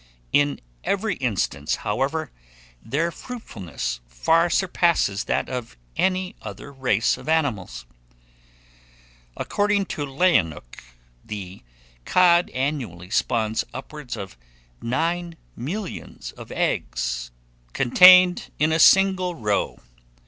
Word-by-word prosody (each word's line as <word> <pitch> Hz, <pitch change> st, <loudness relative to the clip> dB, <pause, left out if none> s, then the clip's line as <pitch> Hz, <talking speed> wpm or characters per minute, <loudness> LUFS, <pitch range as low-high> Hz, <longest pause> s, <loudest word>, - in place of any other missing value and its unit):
In 145 Hz, 0 st, +2 dB, 0.2 s
every 200 Hz, +1 st, 0 dB
instance, 95 Hz, -, -1 dB
however, -, -, -1 dB, 0.5 s
their 155 Hz, +8 st, -1 dB
fruitfulness 90 Hz, -, -6 dB
far 165 Hz, -, +2 dB
surpasses 170 Hz, -, +1 dB
that -, -, 0 dB
of 125 Hz, -, -6 dB, 0.2 s
any 185 Hz, 0 st, 0 dB
other 105 Hz, +6 st, -8 dB
race 125 Hz, -5 st, +1 dB
of -, -, -8 dB
animals. 125 Hz, -, -1 dB, 1.5 s
According 205 Hz, -1 st, 0 dB
to 145 Hz, -, -3 dB
Lewenhoeck, 135 Hz, -, 0 dB, 0.4 s
the 100 Hz, -3 st, -7 dB, 0.4 s
cod 175 Hz, -, +4 dB
annually 125 Hz, -, -3 dB
spawns 110 Hz, 0 st, 0 dB
upwards 135 Hz, -2 st, -7 dB
of 95 Hz, -, -8 dB, 0.4 s
nine 165 Hz, +7 st, -2 dB, 0.2 s
millions 180 Hz, -, -6 dB
of -, -, -12 dB
eggs, -, -, -2 dB, 0.4 s
contained 180 Hz, +7 st, +6 dB
in 155 Hz, +1 st, +2 dB
a 160 Hz, -, +2 dB
single 185 Hz, 0 st, +5 dB
roe. 105 Hz, -7 st, -1 dB
140 Hz, 100 wpm, -23 LUFS, -, 1.5 s, contained